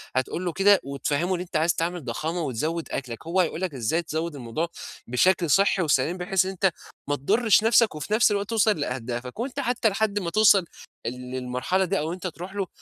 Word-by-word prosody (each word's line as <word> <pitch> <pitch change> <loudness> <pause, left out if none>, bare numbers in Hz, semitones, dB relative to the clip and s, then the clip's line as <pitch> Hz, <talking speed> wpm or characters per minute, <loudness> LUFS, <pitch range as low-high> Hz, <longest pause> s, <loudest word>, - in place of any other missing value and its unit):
هتقول 130 +7 -1
له 175 - -2
كده 200 +2 +5
وتفهِمه 145 +6 -1
إن - - -4
أنت 180 - -9
عايز 165 +2 +2
تعمل 170 0 -2
ضخامة 160 +8 -3
وتزود 155 +4 -2
أكلك، 125 +2 -5
هو 175 +3 0
هيقول 165 0 -2
لك 185 -5 -2
إزاي 130 +6 0
تزود 160 0 -4
الموضوع 135 +6 -3 0.4
بشكل 170 +8 +2
صحّي 195 +3 +3
وسليم، 155 +2 +1
بحيث 185 0 +1
إن 190 - -2
أنت 190 0 +1 0.4
ما 145 - +2
تضرش 215 - +3
نفسك 225 -3 +4
وفي 155 +7 -4
نفس 215 0 +4
الوقت 200 -1 -1
توصل 215 -5 +2
لأهدافك، 125 - -4
وأنت 260 +3 -3
حتى 245 -4 +1
لحد 205 0 0
ما 175 -4 -3
توصل، 205 -1 +5 0.4
ال 120 - -2 0.2
للمرحلة 130 +9 -1
دي 195 +2 0
أو 160 +3 -2
أنت 185 0 -5
تروح 180 +3 -8
له، 195 -2 -2
175 Hz, 200 wpm, -25 LUFS, 145-195 Hz, 0.4 s, كده